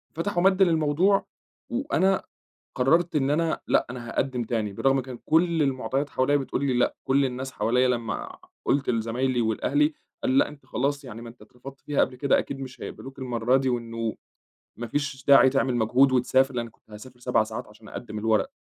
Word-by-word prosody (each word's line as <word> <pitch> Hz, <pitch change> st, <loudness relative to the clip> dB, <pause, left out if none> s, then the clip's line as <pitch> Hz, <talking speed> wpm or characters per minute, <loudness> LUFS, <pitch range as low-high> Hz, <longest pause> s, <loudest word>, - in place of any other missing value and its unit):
فتحوا 175 Hz, +2 st, -1 dB
مدّ 190 Hz, 0 st, +4 dB
للموضوع 170 Hz, +3 st, +3 dB, 0.4 s
وأنا 235 Hz, -7 st, +1 dB, 0.5 s
قرّرت 160 Hz, +6 st, +2 dB
إن 135 Hz, -1 st, +1 dB
أنا 165 Hz, +2 st, 0 dB
لأ، -, -, +2 dB
أنا 120 Hz, -1 st, -7 dB
هاقدّم 125 Hz, 0 st, -1 dB
تاني 110 Hz, -3 st, -2 dB
بالرغم 135 Hz, +6 st, +2 dB
كان 125 Hz, -1 st, -8 dB
كل 165 Hz, 0 st, +2 dB
المُعطيات 135 Hz, +1 st, -1 dB
حواليّا 135 Hz, +3 st, +2 dB
بتقول 140 Hz, 0 st, -2 dB
لي 135 Hz, -, +1 dB
لأ، -, -, +1 dB
كل 135 Hz, +1 st, +2 dB
الناس 130 Hz, +1 st, -4 dB
حواليّا 125 Hz, +2 st, +2 dB
لمّا 120 Hz, -2 st, -3 dB, 0.3 s
قُلت 140 Hz, 0 st, +1 dB
لزمايلي 120 Hz, +2 st, 0 dB
ولأهلي 290 Hz, -, +1 dB, 0.3 s
قال: 270 Hz, 0 st, +2 dB
"لأ، 285 Hz, -, +3 dB
أنت 145 Hz, -1 st, -14 dB
خلاص، 140 Hz, +2 st, -2 dB
يعني 115 Hz, -2 st, -9 dB
ما 115 Hz, -, -9 dB
أنت 120 Hz, -, -14 dB
اترفضت 135 Hz, +2 st, -13 dB
فيها 145 Hz, -1 st, -1 dB
قبل 125 Hz, -, +1 dB
كده 140 Hz, +1 st, +2 dB
أكيد 135 Hz, -1 st, -4 dB
مش 130 Hz, -1 st, -8 dB
هيقبَلوك 135 Hz, +1 st, -8 dB
المرّة 125 Hz, -1 st, +1 dB
دي 135 Hz, 0 st, +1 dB
وإنه 115 Hz, -2 st, -2 dB, 0.6 s
ما 120 Hz, -, -5 dB
فيش 140 Hz, +1 st, -3 dB
داعي 140 Hz, -1 st, +7 dB
تعمل 135 Hz, -2 st, +1 dB
مجهود 125 Hz, +4 st, +3 dB
وتسافر." 130 Hz, +1 st, +2 dB
لإنّي 115 Hz, -1 st, -3 dB
كنت -, -, -31 dB
هاسافر 120 Hz, +4 st, -12 dB
7 125 Hz, -3 st, +2 dB
ساعات 110 Hz, +1 st, -6 dB
عشان 105 Hz, +1 st, -16 dB
أقدّم 110 Hz, -3 st, -7 dB
الورق. 110 Hz, -, +1 dB
130 Hz, 185 wpm, -25 LUFS, 120-145 Hz, 0.6 s, داعي